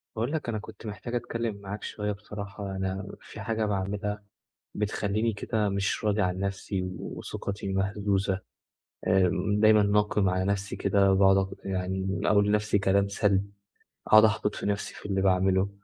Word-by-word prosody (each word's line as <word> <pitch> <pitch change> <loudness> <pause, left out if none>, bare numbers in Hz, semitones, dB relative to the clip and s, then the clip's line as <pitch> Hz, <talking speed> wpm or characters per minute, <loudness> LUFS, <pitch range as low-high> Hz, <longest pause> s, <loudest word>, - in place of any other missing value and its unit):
باقول 115 +5 -1
لك، 155 -6 -2
أنا 110 - -1
كنت 110 +1 -11
محتاج 110 +3 -5
أتكلّم 115 -2 -2
معاك 100 +2 -6
شوية 105 -1 -3
بصراحة، 100 -1 -6
أنا 95 0 -3
في - - -11
حاجة 110 -1 -1
باعملها 105 +1 -2 0.5
بتخلّيني 105 +2 0
كده 105 +1 -1
مش 100 +3 -1
راضي 105 0 +2
عن 90 -1 0
نَفسي 100 0 -2 0.2
وثقتي 100 -1 -5
مهزوزة 95 0 0 0.7
آآ، 90 -1 +4 0.3
دايمًا 110 -1 +6
ناقم 105 -1 +2
على 95 0 0
نَفسي 100 0 -1
كده 100 0 +3
وباقُعد 95 0 +5
أ 95 0 -3
يعني 95 0 -2
أقول 100 -1 +4
لنفسي 105 0 +2
كلام 100 0 +3
سلْب، 100 -1 +1 0.6
أقعُد 110 0 +8
أحبِط 105 -1 +2
في - - -5
نَفسي 100 0 -2
في - - -12
اللي 95 -2 0
باعمله، 95 0 +3
100 Hz, 155 wpm, -28 LUFS, 95-105 Hz, 0.7 s, أقعُد